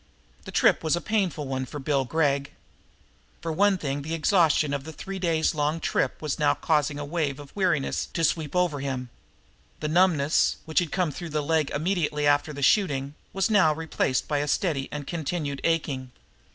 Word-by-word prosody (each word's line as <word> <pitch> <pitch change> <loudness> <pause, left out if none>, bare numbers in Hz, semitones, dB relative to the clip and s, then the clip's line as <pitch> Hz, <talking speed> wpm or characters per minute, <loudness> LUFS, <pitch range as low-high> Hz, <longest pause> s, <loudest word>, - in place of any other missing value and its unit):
The - - -7
trip - - +4
in - - -21
was 160 0 +2
a - - -1
painful 185 -9 -1
one 130 0 -2
for 145 - -7
Bill 135 -1 0
Gregg. 140 -1 0 0.9
For 165 - -4
one 200 +4 +3
thing 145 -3 -3
the 160 +3 -3
exhaustion 160 -4 +3
of 140 -1 -2
the 160 - -9
long - - -23
three 195 -1 -6
days' 165 -3 +1 0.3
trip - - -1
was 150 -1 -2
now 150 - +3
causing 150 -2 +1
a 145 - -4
wave 145 -3 -2
of 145 -1 -12
weariness 180 -8 0
to 165 - -3
sweep 155 0 0
over 175 -5 +1
him. 130 -3 -4 0.7
The 155 - -2
numbness, 160 -4 +3
which 160 - +2
had 175 -4 -2
come 180 -4 0
through 170 +4 -7
the 150 -1 -1
leg 155 -1 +1
immediately 155 -2 0
after 145 +1 +3
the 140 -1 -5
shooting, 140 -6 +2 0.2
was 195 +4 0
now 165 -8 +4
replaced 155 -5 -1
by 145 -2 0
a 145 - -1
steady 145 -3 0
and 145 -1 -5
continued 150 -3 -3
aching. 145 -6 -1
155 Hz, 190 wpm, -26 LUFS, 140-170 Hz, 0.9 s, trip